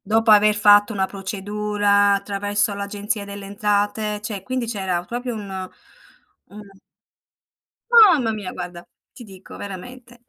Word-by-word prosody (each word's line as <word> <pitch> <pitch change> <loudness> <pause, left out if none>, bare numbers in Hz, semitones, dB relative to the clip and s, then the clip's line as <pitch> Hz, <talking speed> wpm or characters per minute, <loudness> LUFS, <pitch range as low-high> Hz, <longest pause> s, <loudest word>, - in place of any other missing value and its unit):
dopo 225 +2 +1
aver 210 0 +6
fatto 205 +1 +5
una 190 -2 0
procedura 205 +1 0
attraverso 205 +1 -1
l'Agenzia 200 +1 -4
delle 200 0 -9
Entrate, 205 +1 -1
cioè, 210 -3 -5
quindi 255 +2 -3
c'era 190 -6 -3
proprio 240 +3 -5
un 190 -3 -6 0.8
u 210 +1 -11 1.3
Mamma 360 - +6
mia! 205 -4 -6
Guarda, 175 -1 -8 0.3
ti 250 - -12
dico 190 -3 -13
veramente. 240 +5 -10
205 Hz, 125 wpm, -21 LUFS, 200-215 Hz, 1.3 s, aver